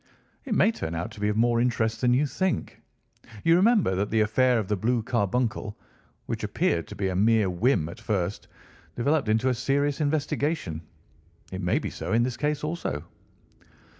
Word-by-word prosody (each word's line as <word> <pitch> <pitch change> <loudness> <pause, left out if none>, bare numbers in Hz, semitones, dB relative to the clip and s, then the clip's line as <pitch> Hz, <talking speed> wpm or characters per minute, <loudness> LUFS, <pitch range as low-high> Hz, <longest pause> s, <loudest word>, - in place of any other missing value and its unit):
"It 240 -6 -1
may 210 +3 +4
turn 85 - -5
out 85 +1 -3
to - - -12
be 105 0 +1
of 105 - -1
more 120 +1 +3
interest 115 -2 0
than 125 -1 +3
you 140 +4 +2
think. 185 +5 -2 0.6
You 165 0 +5
remember 200 - +4
that 100 +2 -1
the 110 0 +2
affair 125 +4 +3
of 105 -4 -1
the 105 - +1
blue 115 +3 0
carbuncle, 115 -2 -1 0.5
which - - -4
appeared 85 -1 0
to 105 - -9
be 100 -1 -1
a 90 - -3
mere 105 0 +3
whim 90 - +1
at 110 +8 -9
first, 100 -3 -2 0.5
developed 140 0 +1
into 110 +4 +2
a - - +2
serious 140 +4 0
investigation. 145 - -1 0.7
It 95 0 -5
may 90 -1 +1
be - - -3
so - - -4
in 115 +1 +4
this 125 0 -2
case, 150 0 -1
also." 150 - -3
115 Hz, 185 wpm, -26 LUFS, 105-140 Hz, 0.7 s, You